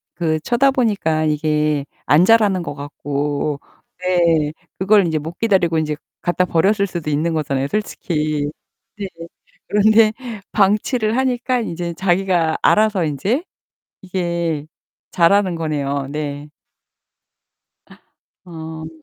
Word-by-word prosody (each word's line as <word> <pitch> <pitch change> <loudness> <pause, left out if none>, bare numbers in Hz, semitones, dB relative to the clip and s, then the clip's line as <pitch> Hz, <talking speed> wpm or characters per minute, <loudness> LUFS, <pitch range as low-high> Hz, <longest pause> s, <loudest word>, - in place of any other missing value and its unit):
그 160 -2 0
쳐다보니까 225 - +1
이게 150 -1 0 0.2
안 160 +5 +5
자라는 205 -5 +4
것 145 - -5
같고 145 0 -3 0.4
네 170 -4 +2 0.3
그걸 200 0 +4
인제 160 -2 0
못 160 +3 -7
기다리고 185 -7 +2
인제 155 -1 0 0.3
갖다 180 +1 +1
버렸을 200 +5 +2
수도 170 -4 -4
있는 160 +3 0
거잖아요, 140 -3 -1
솔직히. 155 -7 -2 0.5
네. 200 -1 -4 0.6
그런데 215 +1 +5 0.4
방치를 215 +3 +2
하니까 255 -1 0
인제 170 -4 -4
자기가 175 -2 +1
알아서 210 -5 +3
인제 195 - -1 0.6
이게 170 -4 -2 0.5
자라는 185 +1 +3
거네요. 140 -4 -2
네. 145 -1 -5 2.0
어. 160 -2 -8
170 Hz, 230 characters per minute, -19 LUFS, 150-200 Hz, 2.0 s, 안